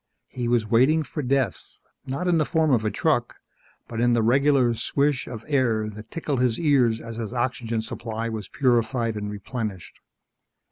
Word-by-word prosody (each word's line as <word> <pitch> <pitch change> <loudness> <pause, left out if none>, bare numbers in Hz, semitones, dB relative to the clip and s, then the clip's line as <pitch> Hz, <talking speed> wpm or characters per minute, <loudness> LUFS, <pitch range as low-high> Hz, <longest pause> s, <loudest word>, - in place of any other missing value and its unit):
He 120 -2 -3
was 120 -2 +2
waiting 130 +9 +3
for 150 - -5
death 130 -6 0 0.5
not 140 +7 -2
in 170 -2 +3
the - - +3
form 160 -1 +1
of 115 -4 +3
a 110 - +1
truck, 105 - 0 0.5
but 115 -1 -4
in 120 0 +3
the 115 -1 +2
regular 135 0 +3
swish 140 +4 0
of 115 -2 -8
air 115 -7 +1
that 105 +1 -11
tickled 150 -5 -2
his 125 -3 +1
ears 130 -8 +3
as 115 -1 -8
his 115 +1 -5
oxygen 120 -2 -1
supply 115 0 -4
was 110 -3 -5
purified 120 -3 +1
and 105 -1 -4
replenished. 105 -3 -6
120 Hz, 175 wpm, -24 LUFS, 110-135 Hz, 0.5 s, waiting